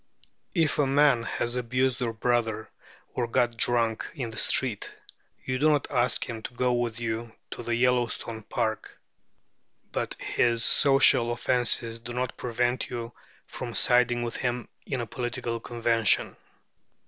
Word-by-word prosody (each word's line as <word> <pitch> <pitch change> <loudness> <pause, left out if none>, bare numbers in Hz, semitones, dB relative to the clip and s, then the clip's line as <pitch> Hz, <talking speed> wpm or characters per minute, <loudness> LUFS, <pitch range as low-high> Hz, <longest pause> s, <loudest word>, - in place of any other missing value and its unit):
If 160 -4 +1
a 145 - +3
man 140 -3 +4
has 120 +1 -2
abused 125 +1 0
your 115 -2 -1
brother, 115 -2 -1 0.4
or 120 -2 -1
got 120 0 +1
drunk 115 -1 0
in 125 -6 -4
the 110 - -10
street, 125 -6 +1 0.5
you 130 0 -2
do 155 +2 +4
not 145 -2 +2
ask 125 -3 +1
him 115 -2 -6
to 120 - -8
go 125 0 +1
with 120 -2 -1
you 115 0 -4 0.2
to - - -6
the 120 0 -1
Yellowstone 120 -2 0
Park. 110 0 -3 0.9
But - - -3
his 115 -1 +1
social 135 -4 +5
offences 120 -1 +1
do 120 +1 -8
not 125 0 -2
prevent 120 +1 -1
you 120 -2 -5 0.3
from 120 -2 -7
siding 120 -1 +4
with 120 - -4
him 125 -1 -2 0.2
in 130 -3 -2
a - - -3
political 120 0 -4
convention. 115 -2 +1
120 Hz, 150 wpm, -27 LUFS, 115-125 Hz, 0.9 s, social